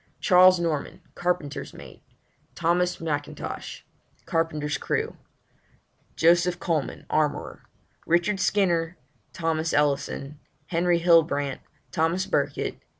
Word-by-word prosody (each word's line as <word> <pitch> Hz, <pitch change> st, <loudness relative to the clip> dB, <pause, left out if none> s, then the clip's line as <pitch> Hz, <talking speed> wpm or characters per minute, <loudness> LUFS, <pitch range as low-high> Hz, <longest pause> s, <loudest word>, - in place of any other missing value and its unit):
CHARLES 185 Hz, -1 st, +6 dB
NORMAN 160 Hz, -4 st, -2 dB
Carpenter's 175 Hz, -5 st, -3 dB
mate. -, -, -12 dB, 0.5 s
THOMAS 175 Hz, +2 st, +1 dB
M'INTOSH 145 Hz, -3 st, -5 dB, 0.4 s
Carpenter's 155 Hz, -2 st, -1 dB
crew. -, -, -2 dB, 1.0 s
JOSEPH 175 Hz, +2 st, +3 dB
COLEMAN 160 Hz, -7 st, -2 dB
Armourer. 150 Hz, -1 st, -1 dB, 0.5 s
RICHARD 175 Hz, +4 st, +2 dB
SKINNER 175 Hz, -4 st, +1 dB, 0.2 s
} -, -, -41 dB
THOMAS 165 Hz, -1 st, -1 dB
ELLISON 145 Hz, 0 st, -1 dB
} 145 Hz, -, -41 dB
HENRY 175 Hz, +1 st, +3 dB
HILLBRANT 160 Hz, -5 st, +3 dB, 0.2 s
} 130 Hz, -, -40 dB
THOMAS 165 Hz, +5 st, 0 dB
BURKITT -, -, 0 dB
} -, -, -21 dB, 0.2 s
Seamen. -, -, -34 dB
165 Hz, 110 wpm, -25 LUFS, 150-175 Hz, 1.0 s, CHARLES